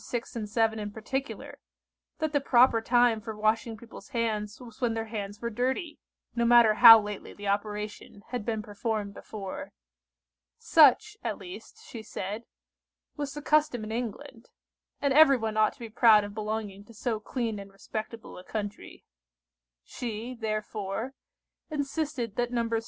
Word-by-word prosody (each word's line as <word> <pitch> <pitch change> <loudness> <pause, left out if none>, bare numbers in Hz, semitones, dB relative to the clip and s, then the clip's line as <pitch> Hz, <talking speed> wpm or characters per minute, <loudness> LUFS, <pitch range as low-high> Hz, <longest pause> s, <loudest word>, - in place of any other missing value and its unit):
6 240 +1 -5
and 215 -3 -4
7 220 0 +1
in 210 -1 -4
particular, 265 +6 -5 0.6
that 315 -1 -2
the 285 - +3
proper 245 -3 +5
time 240 -1 +3
for 220 -1 -7
washing 220 +1 0
people's 235 +5 -13
hands 220 -4 -2
was 240 -1 -13
when 235 -2 +1
their 225 0 -2
hands 205 -2 -6
were 235 - -2
dirty; 260 - -2 0.4
no 235 - +1
matter 235 -2 +6
how 225 0 +11
lately 210 -1 -6
the 205 0 -7
operation 210 0 -3
had 245 -3 -3
been 220 -1 -2
performed 210 -1 -3
before. 215 +9 -7 0.9
Such, 420 - +5
at - - -2
least, 395 +4 -11
she 230 - -8
said, 210 +1 -6 0.7
was 290 -2 -4
the 295 - -6
custom 300 -7 +2
in 215 - -6
England, 240 +2 -6 0.5
and 280 -2 +1
everyone 265 -7 +5
ought 215 0 +3
to - - -25
be 235 - -6
proud 220 -1 +5
of 205 0 -7
belonging 210 -2 -4
to 230 - -16
so 225 0 -2
clean 225 -1 -3
and 200 0 -10
respectable 215 +2 -7
a - - -12
country. 205 0 -6 0.8
She, 235 - -5
therefore, 215 0 -4 0.6
insisted 285 -6 -3
that 240 0 0
Nos. 235 -1 -1
225 Hz, 155 wpm, -28 LUFS, 210-250 Hz, 0.9 s, how